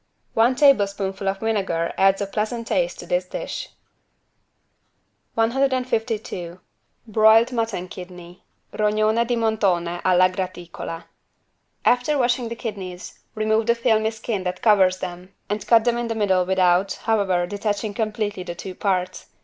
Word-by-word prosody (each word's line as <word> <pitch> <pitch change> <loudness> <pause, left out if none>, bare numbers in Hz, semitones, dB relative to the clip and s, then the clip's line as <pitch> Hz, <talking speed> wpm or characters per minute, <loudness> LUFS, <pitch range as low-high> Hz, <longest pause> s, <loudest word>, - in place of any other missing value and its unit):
One 235 +3 +3
tablespoonful 200 -8 +2
of 195 0 -4
vinegar 195 -7 -1
adds 195 0 +3
a - - 0
pleasant 215 +4 -3
taste - - 0
to - - -9
this - - 0
dish. - - -5 1.7
152 225 -7 -1 0.5
BROILED 220 +2 +5
MUTTON 225 -7 -2
KIDNEY 180 -1 -11 0.3
(Rognone 215 +2 +1
di 245 - +1
montone 190 -7 0
alla 185 0 +5
graticola) 180 -2 -6 0.8
After 250 +5 +3
washing 245 -2 +1
the 230 - -5
kidneys, 190 -6 -7 0.2
remove 220 +1 +1
the 235 - +4
filmy 220 -2 +2
skin 220 -3 -4
that 180 0 -4
covers 190 -4 +4
them 180 +1 -8 0.2
and 210 0 -3
cut 230 -2 +6
them 240 0 +1
in 240 - -2
the 225 - -3
middle 190 -4 +2
without, 185 0 +2
however, 195 -6 +1
detaching 205 +2 -3
completely 210 -2 -2
the 175 -1 -6
two 185 +2 -7
parts. 185 -1 -2
210 Hz, 135 wpm, -22 LUFS, 185-225 Hz, 1.7 s, cut